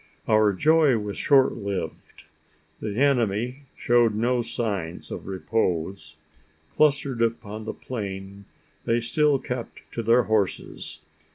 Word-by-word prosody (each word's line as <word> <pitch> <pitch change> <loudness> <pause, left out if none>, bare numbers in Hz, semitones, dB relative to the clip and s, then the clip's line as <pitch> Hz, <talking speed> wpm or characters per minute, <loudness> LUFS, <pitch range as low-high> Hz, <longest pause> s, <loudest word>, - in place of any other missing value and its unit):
Our 110 -1 +4
joy 150 - +4
was 105 -1 -4
short 135 -2 +4
lived: 100 -6 -5 0.6
the 105 -2 -4
enemy 125 -1 +1
showed 120 -2 +3
no 120 +3 +1
signs 100 -8 -4
of - - -6
repose. 90 -3 -2 0.6
Clustered 140 -5 +2
upon 110 -2 -2
the - - -4
plain, 100 -4 -6 0.4
they 115 +1 +2
still 145 +4 +2
kept 125 -2 -6
to 115 - -3
their 115 +2 +4
horses. 105 -6 -2
115 Hz, 115 wpm, -25 LUFS, 100-125 Hz, 0.6 s, Our